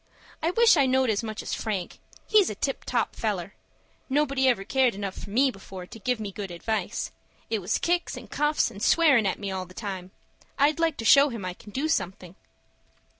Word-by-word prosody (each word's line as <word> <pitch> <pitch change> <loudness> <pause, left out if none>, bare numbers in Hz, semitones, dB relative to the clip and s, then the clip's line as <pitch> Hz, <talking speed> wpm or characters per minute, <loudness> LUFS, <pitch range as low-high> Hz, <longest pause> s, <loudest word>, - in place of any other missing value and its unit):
I 325 - +1
wish 455 0 +5
I 275 -2 +4
knowed 260 -2 +3
as 205 - 0
much 220 -1 -5
as - - -4
Frank. 200 -6 -3 0.3
He's 425 -3 +4
a 210 - -5
tip 270 +6 -3
top - - -1
feller. - - -2 0.6
Nobody 275 -1 +2
ever 240 -6 +2
cared 255 +1 +2
enough 200 -1 -4
for - - -9
me 260 +6 +3
before 190 -3 -10
to 225 +5 -12
give 250 +3 -1
me 205 -2 -4
good 195 0 -6
advice. 215 +6 -3 0.4
It 220 - +1
was 180 - 0
kicks, 345 0 0
and - - -9
cuffs, 295 -4 +1
and 200 -2 -11
swearin' 280 -10 +4
at 190 - -1
me 200 -1 -4
all 185 -1 -4
the 185 - -16
time. 190 -4 -5 0.5
I'd 295 +3 +3
like 330 -3 +1
to 225 - -5
show 280 +4 +7
him 230 -6 -6
I 180 - -3
can 205 - -15
do 275 +8 -1
something." 190 - -2
225 Hz, 210 wpm, -26 LUFS, 195-280 Hz, 0.6 s, show